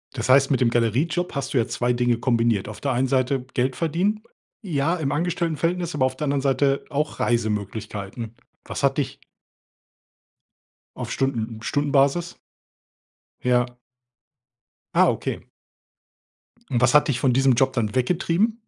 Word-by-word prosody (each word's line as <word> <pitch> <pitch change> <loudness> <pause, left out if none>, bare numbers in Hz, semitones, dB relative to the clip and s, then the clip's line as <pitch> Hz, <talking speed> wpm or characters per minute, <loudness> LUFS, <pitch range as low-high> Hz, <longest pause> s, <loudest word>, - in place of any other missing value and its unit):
Das 115 +1 -3
heißt, 135 +1 +6
mit 135 -2 +1
dem 120 - +4
Galeriejob 130 - 0
hast 140 - -3
du - - +2
ja 115 - +2
2 120 0 0
Dinge 120 -1 +1
kombiniert. 115 -5 +1
Auf 110 - -9
der 140 -2 -1
einen 130 +2 0
Seite 130 -1 +1
Geld 130 +1 0
verdienen 185 +7 0 0.4
ja, 165 -3 0
im 145 -5 -2
Angestelltenverhältnis, 170 +1 -1
aber 130 -3 +2
auf 130 0 -1
der 150 - -3
anderen 140 -1 +1
Seite 135 0 +1
auch 150 +1 -2
Reisemöglichkeiten. 110 -1 -2 0.3
Was - - -5
hat - - +2
dich - - -2 1.8
Auf - - -5
Stunden 120 -4 -1
n 110 - -13
Stundenbasis? 145 +4 +1 1.1
Ja. 125 0 +1 1.2
Ah, - - +6
okay. - - -3 1.3
Und 125 -2 +1
was 130 +1 +4
hat 150 - +5
dich 125 -3 0
von 130 -3 +2
diesem 135 0 +4
Job 130 +2 +2
dann 115 -2 -1
weggetrieben? 180 - +1
135 Hz, 150 wpm, -23 LUFS, 120-150 Hz, 1.8 s, heißt